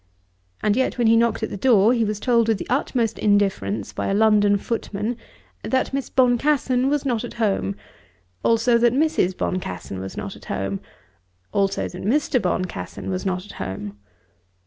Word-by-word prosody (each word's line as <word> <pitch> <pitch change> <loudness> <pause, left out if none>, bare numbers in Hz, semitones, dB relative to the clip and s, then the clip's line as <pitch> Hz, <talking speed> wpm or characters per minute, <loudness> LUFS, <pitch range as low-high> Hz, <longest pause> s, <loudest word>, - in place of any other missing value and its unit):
And 210 -1 +3
yet 260 0 0
when 240 - +1
he 225 +1 +6
knocked 230 0 +2
at - - -2
the - - -4
door, 225 0 +4
he 235 -2 +1
was 210 -1 -2
told 235 -1 +2
with 225 -2 +2
the - - -6
utmost 240 -4 0
indifference 195 - +1
by - - -3
a 195 - +1
London 205 -1 +4
footman, 215 +1 -3 0.5
that 260 0 -1
Miss 275 -1 -2
Boncassen 255 0 +2
was 290 -1 0
not 240 -4 0
at 240 - -7
home, 195 - 0 0.7
also 230 +1 +3
that 240 0 +4
Mrs. 290 - +1
Boncassen 95 - -3
was 95 0 -7
not - - -5
at - - -15
home; 95 0 -3 0.7
also 195 -1 +1
that 180 - -9
Mr. 250 +3 +1
Boncassen 180 - -3
was 185 +1 -2
not 185 0 -2
at - - -11
home. 100 +2 -6
220 Hz, 170 wpm, -22 LUFS, 185-245 Hz, 0.7 s, he